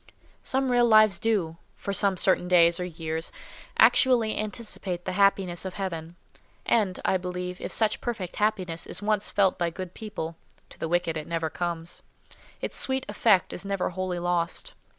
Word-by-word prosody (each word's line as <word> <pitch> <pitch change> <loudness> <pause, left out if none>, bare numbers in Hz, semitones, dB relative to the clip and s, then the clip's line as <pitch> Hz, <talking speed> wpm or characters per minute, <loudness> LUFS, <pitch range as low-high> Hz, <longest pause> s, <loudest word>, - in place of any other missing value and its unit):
Some 265 -1 0
real 240 -1 +4
lives 215 -4 +6
do—for 200 -2 -2
some 195 -1 +2
certain 180 -1 +2
days 170 -1 +5
or 180 - -2
years—actually 200 - +1
anticipate 205 -4 -4
the 185 - -2
happiness 190 -2 +2
of 190 -1 -6
Heaven; 170 -4 -5 0.5
and, 200 -6 +1
I 190 - +3
believe, 180 0 -5
if - - -4
such 220 -2 +1
perfect 215 -7 -4
happiness 190 -6 -1
is - - -3
once 210 -1 +1
felt 195 -2 +2
by 170 -1 +1
good 180 +1 -7
people 175 -7 -6 0.3
(to - - -14
the 165 - -3
wicked 175 -2 0
it 155 - -6
never 165 -2 -2
comes), 170 -1 -4 0.6
its - - -3
sweet 265 0 +2
effect 205 -2 +2
is - - -4
never 195 -2 -1
wholly 185 0 -3
lost. 175 - -1
185 Hz, 160 wpm, -26 LUFS, 175-215 Hz, 0.6 s, lives